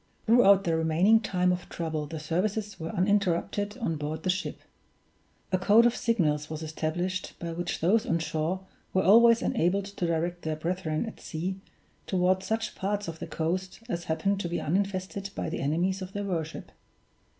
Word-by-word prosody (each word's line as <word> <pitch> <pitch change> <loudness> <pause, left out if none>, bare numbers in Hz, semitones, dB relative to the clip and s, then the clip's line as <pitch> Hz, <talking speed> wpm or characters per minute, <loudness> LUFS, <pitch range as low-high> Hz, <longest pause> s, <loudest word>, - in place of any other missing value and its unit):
Throughout 200 -4 +6
the 165 -3 +1
remaining 165 +7 +4
time 180 -4 +1
of 180 0 -3
trouble 160 -3 -3
the 160 +1 -6
services 195 +6 -2
were 160 0 -4
uninterrupted 205 +1 0
on 195 -11 -2
board 155 +1 -4
the 185 - +3
ship. 185 +2 -4 0.9
A 185 - +2
code 210 +5 +6
of 240 - +3
signals 155 -10 +1
was 155 0 -5
established 170 +4 -3
by 170 -1 -5
which 175 +1 -3
those 215 +8 +3
on 165 - +2
shore 160 +3 -2 0.3
were 190 - +4
always 230 +3 +6
enabled 190 +4 +1
to 200 -3 -3
direct 170 +1 -1
their 155 -1 -2
brethren 165 +1 -2
at 225 - -8
sea 180 +4 -4 0.5
toward 185 0 +2
such 220 +2 -2
parts 205 +1 -2
of 165 -1 -6
the - - -5
coast 185 +5 -3
as 170 -7 -3
happened 195 +5 0
to 175 - -3
be 170 - -1
uninfested 195 +3 -2
by - - -2
the 170 - -3
enemies 175 +7 0
of 185 +1 -7
their 205 0 -3
worship. 165 -5 -4
180 Hz, 175 wpm, -28 LUFS, 160-200 Hz, 0.9 s, Throughout